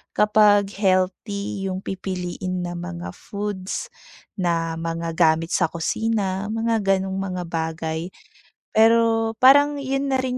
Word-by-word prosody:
kapag 210 -1 +4
healthy 195 +1 0
yung 185 +1 -4
pipiliin 185 -1 -4
na 175 0 -5
mga 175 0 -6
foods 200 0 -5 0.5
na 165 -2 -1
mga 165 0 -3
gamit 165 0 +3
sa - - +2
kusina, 195 +3 -1
mga 225 +1 0
ganong 195 -1 0
mga 185 -2 -3
bagay. 160 0 -3 0.6
Pero 225 0 +3
parang 285 +2 +6
'yun 270 +1 -1
na 260 - +2
rin 255 -1 -2
190 Hz, 120 wpm, -23 LUFS, 175-220 Hz, 0.6 s, parang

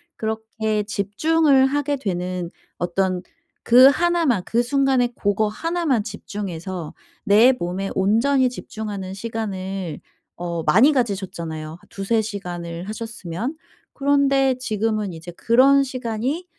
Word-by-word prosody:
그렇게 220 -1 -2
집중을 265 +8 +2
하게 290 +1 -1
되는 180 -5 -3 0.3
어떤 180 +1 -1 0.4
그 250 +3 +8
1 345 +4 +1
만 235 -10 +2
그 235 +1 +1
순간에 265 -1 +2
고거 210 0 0
1 335 +9 -3
만 245 -8 +2
집중해서 190 -5 -6 0.3
내 220 +4 +6
몸에 185 +3 -3
온전히 245 +7 +3
집중하는 205 -6 -6
시간을 195 -5 -4 0.4
어 170 -1 -3
많이 245 - +5
가지셨잖아요 175 - -3
한 160 - -10
2-3 210 +3 0
시간을 175 -4 -6
하셨으면. 225 - -5 0.4
그런데 275 -2 +3
지금은 215 -4 -1
이제 165 +2 -9
그런 270 +4 +5
시간이 255 +5 -3
220 Hz, 245 characters per minute, -22 LUFS, 190-260 Hz, 0.4 s, 그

